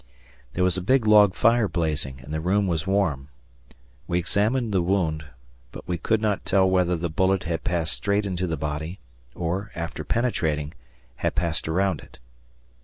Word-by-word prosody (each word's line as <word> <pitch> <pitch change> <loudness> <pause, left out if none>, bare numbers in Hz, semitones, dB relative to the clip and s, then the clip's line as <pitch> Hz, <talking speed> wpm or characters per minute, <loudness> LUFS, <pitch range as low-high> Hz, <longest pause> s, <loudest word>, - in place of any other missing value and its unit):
There 90 - 0
was 90 -1 +2
a - - -2
big 125 +5 +2
log 105 -3 +6
fire 115 -1 +3
blazing, 75 -7 -2
and 75 +3 -8
the 80 - -2
room 100 +4 +2
was 85 -2 -1
warm. 80 -9 0 0.8
We 85 - 0
examined 105 +6 0
the 95 - +3
wound, 85 -4 0 0.5
but - - -10
we 90 -2 -2
could 110 +7 +1
not 105 -2 0
tell 95 -1 +3
whether 90 -1 +2
the 85 +1 -2
bullet 95 +3 +1
had 80 0 -3
passed 85 -3 -1
straight 100 0 0
into 90 -2 -2
the 80 -2 -2
body, 75 +4 -4 0.4
or, 90 +5 -2
after 85 -2 -4
penetrating, 80 - -1 0.4
had - - -1
passed 85 -2 -1
around 95 +4 +1
it. - - -16
90 Hz, 175 wpm, -25 LUFS, 80-100 Hz, 0.8 s, log